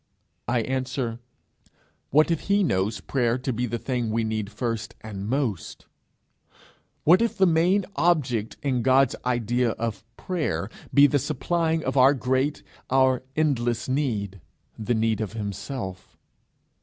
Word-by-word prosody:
I 120 Hz, 0 st, +1 dB
answer, 130 Hz, -2 st, -2 dB, 0.9 s
What 155 Hz, +4 st, +4 dB
if 165 Hz, -, -2 dB
he 200 Hz, 0 st, +4 dB
knows 105 Hz, -, 0 dB
prayer 120 Hz, -3 st, 0 dB
to 130 Hz, 0 st, -3 dB
be 120 Hz, +2 st, -1 dB
the 120 Hz, +1 st, -2 dB
thing 120 Hz, -1 st, -2 dB
we 115 Hz, +1 st, 0 dB
need 110 Hz, -2 st, -3 dB
first 115 Hz, 0 st, -3 dB
and 100 Hz, -2 st, -6 dB
most? 125 Hz, -, -2 dB, 1.2 s
What 175 Hz, +7 st, +6 dB
if 235 Hz, -, 0 dB
the 190 Hz, -, +5 dB
main 180 Hz, +3 st, +3 dB
object 130 Hz, -11 st, +1 dB
in 130 Hz, -4 st, 0 dB
God's 135 Hz, +2 st, +4 dB
idea 120 Hz, -1 st, +1 dB
of 115 Hz, -2 st, -4 dB
prayer 115 Hz, -, -2 dB, 0.2 s
be 140 Hz, 0 st, +7 dB
the 145 Hz, 0 st, +3 dB
supplying 160 Hz, +4 st, -1 dB
of -, -, -2 dB
our 135 Hz, +2 st, +6 dB
great, 130 Hz, +3 st, 0 dB, 0.3 s
our 130 Hz, -1 st, +3 dB
endless 120 Hz, -7 st, 0 dB
need 110 Hz, -, -2 dB, 0.3 s
the 115 Hz, +2 st, -1 dB
need 110 Hz, -1 st, +1 dB
of 110 Hz, -1 st, -4 dB
himself? 100 Hz, -1 st, -6 dB
125 Hz, 140 wpm, -25 LUFS, 110-145 Hz, 1.2 s, be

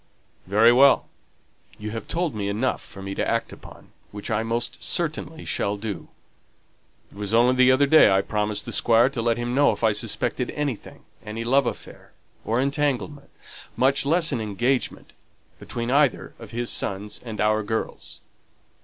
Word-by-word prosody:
"Very 110 Hz, +5 st, +5 dB
well; 135 Hz, +2 st, +5 dB, 0.7 s
you 105 Hz, -1 st, -6 dB
have 110 Hz, -1 st, -6 dB
told 170 Hz, -2 st, -1 dB
me 100 Hz, -2 st, -3 dB
enough 115 Hz, +6 st, -1 dB
for 95 Hz, -, -11 dB
me 95 Hz, 0 st, -5 dB
to -, -, -2 dB
act -, -, -1 dB
upon, -, -, -14 dB, 0.2 s
which 105 Hz, +3 st, -6 dB
I 110 Hz, 0 st, +1 dB
most 115 Hz, +1 st, -3 dB
certainly 160 Hz, -1 st, -3 dB
shall 100 Hz, +1 st, -1 dB
do. 100 Hz, -4 st, -6 dB, 1.0 s
It -, -, -17 dB
was 105 Hz, +1 st, -1 dB
only 120 Hz, +2 st, +5 dB
the 130 Hz, 0 st, +5 dB
other 130 Hz, +2 st, +4 dB
day 155 Hz, +3 st, +6 dB
I 95 Hz, 0 st, +3 dB
promised 105 Hz, -1 st, -2 dB
the -, -, -6 dB
Squire 120 Hz, +2 st, +4 dB
to 130 Hz, -4 st, -4 dB
let 115 Hz, 0 st, +1 dB
him 120 Hz, 0 st, -3 dB
know 145 Hz, +2 st, +4 dB
if 105 Hz, -, -9 dB
I 110 Hz, -, +4 dB
suspected 110 Hz, +4 st, -2 dB
anything 145 Hz, -7 st, -4 dB, 0.2 s
any 110 Hz, +2 st, -5 dB
love 135 Hz, +2 st, +2 dB
affair, -, -, -8 dB, 0.3 s
or 115 Hz, +2 st, 0 dB
entanglement, 140 Hz, +1 st, -1 dB, 0.5 s
much 135 Hz, +2 st, +2 dB
less 165 Hz, +4 st, +2 dB
an 115 Hz, -, -1 dB
engagement, 120 Hz, +5 st, -2 dB, 0.5 s
between 120 Hz, +1 st, -4 dB
either 145 Hz, 0 st, +2 dB
of 115 Hz, -3 st, -10 dB
his 120 Hz, +2 st, -3 dB
sons 100 Hz, +1 st, -4 dB
and 115 Hz, -3 st, -7 dB
our 110 Hz, 0 st, +2 dB
girls." 110 Hz, +2 st, -5 dB
115 Hz, 170 wpm, -24 LUFS, 105-135 Hz, 1.0 s, day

